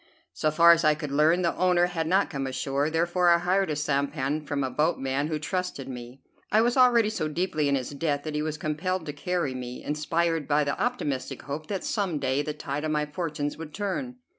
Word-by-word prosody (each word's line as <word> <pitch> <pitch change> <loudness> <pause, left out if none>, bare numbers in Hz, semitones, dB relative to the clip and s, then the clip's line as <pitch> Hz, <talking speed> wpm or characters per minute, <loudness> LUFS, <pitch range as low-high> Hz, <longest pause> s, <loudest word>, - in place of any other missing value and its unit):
So 120 - +1
far 170 +2 +7
as 170 0 +4
I 155 -1 +4
could 150 -2 -5
learn, 155 +5 +3
the 170 - +1
owner 180 -1 +3
had 170 -3 -2
not 190 +3 +2
come 135 -3 -3
ashore; 135 +2 -1
therefore 175 +2 +2
I 170 - +6
hired 185 +2 +1
a 150 - -1
sampan 140 0 -1
from 140 -1 -1
a 130 - -2
boatman 145 -2 0
who 155 -1 -1
trusted 180 -3 -3
me. 125 0 -9 0.3
I 215 - +5
was 240 +1 +2
already 240 -4 +5
so 155 -8 -2
deeply 155 -2 0
in 140 - +3
his 130 0 -3
debt 145 -1 -1
that 155 - -4
he 150 - -1
was 155 0 -3
compelled 160 +4 -2
to 145 - -5
carry 160 -1 -2
me, 125 -1 -6
inspired 160 +1 0
by 150 0 +3
the 140 -1 -2
optimistic 150 - -2
hope 145 +3 -5
that 195 -3 -3
some 195 -7 -1
day 130 0 0
the 150 - -3
tide 145 0 -4
of 155 - -1
my 150 -1 +1
fortunes 150 -1 -4
would 160 -2 -8
turn. 205 +6 -3
155 Hz, 220 wpm, -27 LUFS, 145-175 Hz, 0.3 s, far